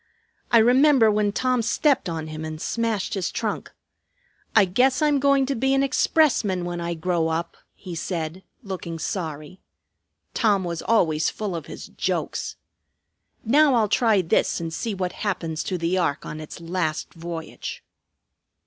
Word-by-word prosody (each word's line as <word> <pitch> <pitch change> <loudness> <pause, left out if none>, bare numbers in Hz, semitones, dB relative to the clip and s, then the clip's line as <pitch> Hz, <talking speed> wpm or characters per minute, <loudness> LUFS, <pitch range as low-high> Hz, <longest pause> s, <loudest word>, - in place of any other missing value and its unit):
"I 235 - +7
remember 250 0 +5
when 210 -1 +1
Tom 255 +2 +1
stepped 270 - +1
on 160 -2 -4
him 155 0 -6
and 155 0 -5
smashed 225 0 -1
his 190 -3 -2
trunk. - - -3 0.8
'I 215 -3 +7
guess 250 +8 +2
I'm 295 -2 +3
going 275 -1 +3
to 275 - -1
be 265 +2 +1
an 270 - +3
expressman 245 - +2
when 175 0 -4
I 170 0 -2
grow 165 0 0
up,' 165 +1 -2 0.2
he 185 -3 -9
said, 165 +1 -4 0.2
looking 185 -5 -5
sorry. 160 0 -5 0.7
Tom 205 -5 +2
was 170 -2 -3
always 160 -9 +2
full 205 -4 -4
of 160 -3 -6
his - - -8
jokes. - - -3 0.9
Now 280 +3 +5
I'll 220 -3 +3
try 215 -4 +3
this 165 - +1
and 165 -1 -4
see 220 +4 -3
what 180 -1 -2
happens 165 -6 -3
to 185 - -2
the 175 +2 0
ark 145 -5 -1
on 155 - -6
its 155 +2 -9
last 165 -2 -2
voyage." 165 -1 -7
185 Hz, 160 wpm, -24 LUFS, 165-230 Hz, 0.9 s, I